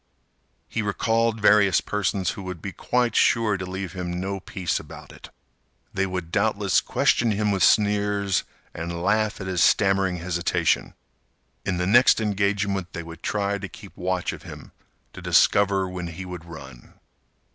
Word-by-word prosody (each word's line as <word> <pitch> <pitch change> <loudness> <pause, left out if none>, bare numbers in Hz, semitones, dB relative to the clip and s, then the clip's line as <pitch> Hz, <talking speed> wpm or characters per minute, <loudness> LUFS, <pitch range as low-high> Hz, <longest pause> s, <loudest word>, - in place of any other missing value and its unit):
He 115 - -2
recalled 115 +3 0
various 105 -2 +5
persons 95 -3 -1
who - - -8
would 90 -2 -6
be 100 - -6
quite 120 +3 0
sure 115 -3 +3
to 95 -1 -5
leave 95 -1 -5
him 90 -1 -4
no 95 +1 -3
peace 95 -2 -3
about - - -12
it. - - -13 0.6
They 95 0 0
would 90 -3 -5
doubtless - - +2
question 115 - +2
him 105 0 0
with 95 -2 -1
sneers, 100 -2 +2 0.3
and 85 +1 -5
laugh 110 +2 +1
at 95 - -6
his 95 -2 -1
stammering 95 -2 +3
hesitation. 85 0 0 0.7
In 90 - 0
the 90 - 0
next 120 +7 +5
engagement 100 -3 -1
they 85 - -5
would 85 0 -11
try 100 -1 -1
to 95 -1 -6
keep 100 -4 -13
watch 90 0 -2
of - - -10
him - - -11 0.4
to - - -10
discover 100 -2 +3
when 90 -1 -5
he 85 +3 -7
would 90 -2 -8
run. 80 -7 -12
95 Hz, 160 wpm, -24 LUFS, 90-105 Hz, 0.7 s, various